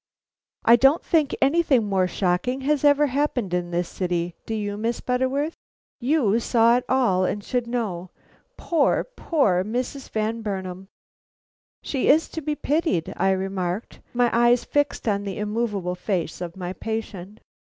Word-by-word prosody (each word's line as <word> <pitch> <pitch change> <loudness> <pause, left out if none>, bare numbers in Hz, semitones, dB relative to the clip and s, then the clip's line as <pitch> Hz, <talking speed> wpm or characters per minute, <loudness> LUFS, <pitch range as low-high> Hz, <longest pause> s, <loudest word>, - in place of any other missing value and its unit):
I 235 +1 +7
don't 270 +6 +4
think 310 -4 +2
anything 275 -5 +3
more 190 -2 +1
shocking 190 +9 -1
has 290 +1 0
ever 290 0 +5
happened 260 -8 -1
in 175 -1 -1
this 175 0 -1
city, 175 -2 -2
do 225 - -2
you, 205 -1 -3
Miss 225 +3 -2
Butterworth? 260 +5 -1 0.5
You 245 -5 +2
saw 235 0 +4
it 250 - -4
all, 240 -9 +2
and 205 +2 -2
should 245 0 -2
know. 200 -7 -3 0.5
Poor, 325 -5 +1
poor 275 - 0
Mrs. 250 +5 -4
Van 220 +1 -2
Burnam!" 190 -3 -5 1.0
"She 270 -3 -1
is 310 +3 +4
to 320 - -5
be 300 0 -2
pitied!" 295 - 0
I 195 - +1
remarked, 190 +1 -2
my 245 -1 +2
eyes 240 +1 +4
fixed 290 -4 -1
on 200 -2 +1
the 195 -2 -5
immovable 210 -4 -2
face 180 -2 -3
of 175 0 -6
my 180 -1 -4
patient. 215 -1 -5
225 Hz, 150 wpm, -24 LUFS, 190-265 Hz, 1.0 s, I